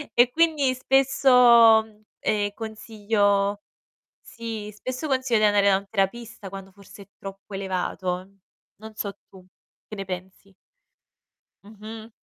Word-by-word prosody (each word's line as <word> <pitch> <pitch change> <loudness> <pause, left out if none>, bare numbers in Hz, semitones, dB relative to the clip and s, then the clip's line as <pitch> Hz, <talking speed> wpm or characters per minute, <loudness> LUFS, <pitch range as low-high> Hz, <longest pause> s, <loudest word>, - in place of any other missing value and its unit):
e 245 +1 +5
quindi 310 -5 +2
spesso, 250 -4 +5 0.4
ehm, 205 -1 0
consiglio 205 -2 -1 0.6
sì, 225 -2 -7
spesso 255 +8 -5
consiglio 260 -4 +1
di 215 - +3
andare 205 -1 +3
da 190 - +4
un 200 0 -9
terapista 220 +1 -3
quando 195 0 -10
forse 200 +1 -15
è - - -25
troppo 195 +1 -10
elevato. 185 -1 -3 0.5
Non 220 +1 -12
so 200 -2 -4 0.2
tu, 185 -2 -16 0.4
che 215 - -7
ne 195 - -6
pensi? 190 +1 -9 1.1
Mh-mh. 220 +2 -11
210 Hz, 125 wpm, -24 LUFS, 195-230 Hz, 1.1 s, e